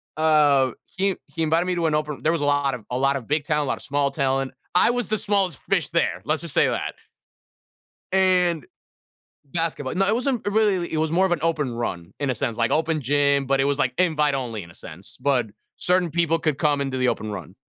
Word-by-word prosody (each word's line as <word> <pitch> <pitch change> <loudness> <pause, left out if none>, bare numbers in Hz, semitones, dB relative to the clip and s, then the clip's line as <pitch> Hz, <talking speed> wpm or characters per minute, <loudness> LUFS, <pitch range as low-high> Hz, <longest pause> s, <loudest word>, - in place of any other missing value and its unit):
Uh, 150 -4 +4
he 195 0 -1
he 165 - -6
invited 160 +2 +2
me 185 - 0
to 170 -2 0
an 155 - +1
open 150 -1 -2
there 160 - +2
was 165 -2 -1
a - - +1
lot 145 -2 +1
of 115 -4 -11
a 125 - 0
lot 135 +1 +2
of 130 -5 -5
big 150 +1 0
talent, 150 -1 0
lot - - -1
of - - -13
small 140 0 0
talent. 135 -1 0 0.2
I 180 - +5
was 245 -4 -2
the 215 - 0
smallest 200 -4 0
fish 195 -5 0
there 170 +1 0
let's 155 +1 -1
just 165 -5 -3
say - - +4
that. - - -2 1.2
And 180 -5 +3 0.9
Basketball 165 -5 -2
no, 195 +1 +3
it 205 - +3
wasn't 250 -2 -1
it 205 - 0
really 205 -5 +1
it - - -1
was 160 0 0
more 185 +4 +3
of 180 - -1
an 170 - 0
open 155 -7 0
run, 90 -8 -4
in 140 -2 0
a - - 0
sense, 115 +1 -2
like 115 -1 +1
open 160 0 +1
gym, 140 +1 +2
but 135 +1 +2
it 135 - +3
was, 140 0 0
like, 125 - +1
invite 150 -5 +2
only 120 -6 -3
in 85 - -13
a - - -16
sense, 85 +5 -7
but 130 -5 +1 0.3
certain 180 -1 +2
people 165 0 +1
could 155 -3 0
come 145 -1 +1
into 135 -2 -2
the 125 0 +2
open 110 -3 -2
run. 95 -1 -8
150 Hz, 235 wpm, -23 LUFS, 135-170 Hz, 1.2 s, I